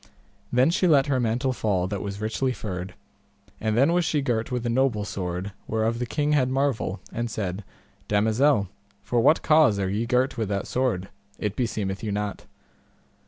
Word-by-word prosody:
Then 130 +6 +4
she 180 +1 +2
let 140 -5 +5
her 135 -3 +1
mantle 125 +3 0
fall 100 -7 0
that 100 -1 -3
was 100 0 -5
richly 115 +4 -1
furred; 95 -2 -6 0.6
and 110 0 0
then 140 +7 +4
was 175 0 +3
she 150 -3 0
girt 115 -1 -1
with 125 -1 -2
a - - +1
noble 120 -4 +1
sword 90 0 -4 0.2
whereof 110 +1 0
the 125 - -2
king 150 +4 0
had 135 -4 +3
marvel, 130 -8 0
and 120 0 -2
said, 100 -3 -3 0.4
Damosel, 110 +2 +3 0.4
for 120 +3 0
what 150 +7 +4
cause 155 -9 +5
are 95 -1 -1
ye 110 +4 -1
girt 125 0 +1
with 110 -3 -1
that 100 0 -1
sword? 120 -8 -1 0.3
it 105 0 -3
beseemeth 110 -6 -2
you 105 - -2
not. 105 0 -3
115 Hz, 180 wpm, -25 LUFS, 100-130 Hz, 0.6 s, let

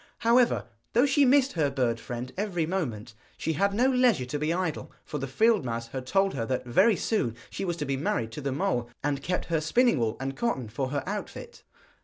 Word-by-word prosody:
However, 240 +1 +4 0.3
though 245 +4 +5
she 280 0 +4
missed 270 +1 +4
her 155 -4 +1
bird 125 -4 0
friend 125 +2 -6
every 185 -5 -1
moment, 125 - -3 0.2
she 160 - -1
had 200 +6 +2
no 230 +6 +2
leisure 250 - +3
to 145 +4 -4
be 155 +2 0
idle, 175 -3 -2
for 150 - -4
the 135 - -3
field 215 - +3
mouse 115 -1 -4
had 130 0 -6
told 195 +5 +2
her 120 - -2
that 130 +2 -2
very 190 - +4
soon 150 - -1 0.2
she - - -4
was 175 -2 -2
to 150 - -3
be 135 -1 -1
married 115 -5 -1
to 135 - -6
the 140 0 -2
mole, 120 -3 -1
and 140 -1 -1
kept 180 +5 -2
her 165 -2 0
spinning 235 - +3
wool 115 -1 0
and 135 +1 -3
cotton 135 - -2
for 130 +4 -3
her 140 0 -2
outfit. 210 - -6
150 Hz, 220 wpm, -27 LUFS, 130-205 Hz, 0.3 s, though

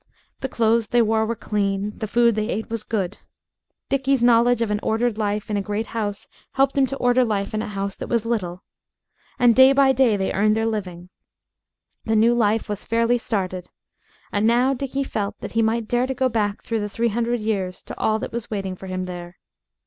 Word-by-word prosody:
The 265 - -3
clothes 230 -1 +2
they 240 +1 +3
wore 220 0 +1
were 230 - -1
clean; 205 -1 -2
the 215 - -4
food 235 +2 +3
they 215 +1 -2
ate 220 +1 -3
was 230 -1 -2
good. 200 -6 -3 0.7
Dickie's 270 -2 +1
knowledge 240 0 +4
of 215 - -2
an 210 - 0
ordered 225 0 0
life 210 0 -1
in 210 - -1
a - - 0
great 210 +3 -3
house 205 -3 -3 0.3
helped 270 +1 +2
him 275 -1 +3
to 275 - -5
order 245 0 +3
life 205 -4 -2
in 215 - -1
a - - -4
house 200 -1 -4
that - - -6
was 230 -2 0
little. 185 -6 -2 0.7
And 245 -3 +5
day 260 +1 +7
by 275 -1 +5
day 250 -5 +3
they 190 -1 -1
earned 215 +2 +2
their 225 - 0
living. 180 -5 -4 1.0
The 225 - +1
new 225 +2 +4
life 225 -2 +1
was 210 -1 -4
fairly 230 +1 +1
started. 185 -5 -3 0.6
And 205 +2 +1
now 245 +3 +3
Dickie 275 +1 -2
felt 205 -6 -4
that - - -7
he 225 - +1
might 225 0 0
dare 245 +2 +1
to 265 - -3
go 260 +1 +1
back 210 -3 -1
through 225 -1 -2
the 210 0 -3
three 230 +3 0
hundred 235 +2 -1
years 195 -4 -2
to - - -8
all 215 0 +2
that - - -5
was 235 -1 -4
waiting 195 -3 -3
for 190 - -10
him 185 0 -3
there. 175 -1 -8
220 Hz, 215 wpm, -22 LUFS, 205-240 Hz, 1.0 s, day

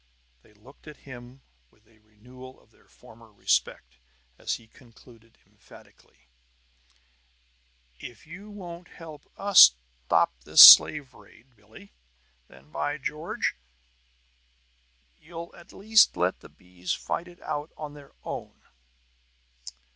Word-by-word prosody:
They 105 - -26
looked 125 +9 -21
at 150 - -14
him 130 0 -14 0.3
with 105 - -34
a 110 0 -29
renewal 125 +5 -17
of - - -30
their - - -30
former 115 0 -20
respect - - -3 0.4
as - - -4
he 115 - -16
concluded 115 -1 -22
emphatically: 65 -1 -23 1.7
"If 120 -3 -13
you 190 +7 -13
won't 175 -4 -12
help 160 -3 -15
us 195 - +6 0.3
stop - - +1
this - - +8
slave 145 -4 +6
raid, 115 +5 -22
Billie, 105 - -19 0.5
then, 70 +4 -21
by 75 -1 -4
George, - - -5 1.6
you'll 170 +1 -12
at 170 - -18
least 220 +2 +2
let - - -2
the - - -17
bees 90 0 -8
fight 175 - -6
it 175 0 -18
out 145 +2 -6
on 150 -2 -9
their 145 -2 -17
own!" - - -9
125 Hz, 120 wpm, -25 LUFS, 105-160 Hz, 1.7 s, this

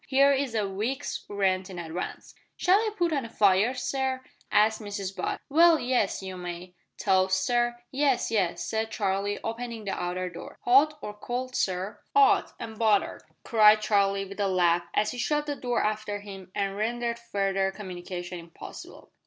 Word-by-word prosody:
Here 275 +1 +5
is 270 -4 -1
a 210 -2 +1
week's 225 +9 -3
rent 190 -2 0
in 185 - -8
advance." 170 +1 -6 0.2
"Shall 370 +3 +4
I 445 0 0
put 345 -3 +1
on 280 -3 0
a 230 - -7
fire, 210 +3 +3
sir?" 260 +1 -2 0.3
asked 220 +2 +3
Mrs 200 -2 -5
Butt. - - -2
"Well, 330 +3 +6
yes 245 -6 0
you 190 -1 -6
may." 180 0 -7 0.2
"Toast, 190 -1 +2
sir?" 240 -1 +1 0.2
"Yes, 275 -3 +1
yes," 195 -6 0
said 220 0 -1
Charlie, 200 -1 -1
opening 230 0 -4
the 195 - -2
outer 180 0 -2
door. 175 -1 -9
"'Ot 280 +5 +5
or 210 - -5
cold, 250 +4 -4
sir?" 190 +2 -1 0.2
"'Ot, 420 -1 +5
and 225 -2 -7
buttered," 215 -3 +2 0.2
cried 215 -1 +6
Charlie, 200 -2 +2
with 195 +1 -10
a 200 - +2
laugh, 175 -2 +3
as 215 0 +2
he 245 - -7
shut 295 +4 0
the 290 -1 -2
door 245 -3 -1
after 210 -1 -2
him 195 -2 -10
and 195 -1 -1
rendered 235 +2 -2
further 195 -4 0
communication 180 -2 -6
impossible. 165 0 -11
210 Hz, 170 wpm, -27 LUFS, 190-245 Hz, 0.3 s, Well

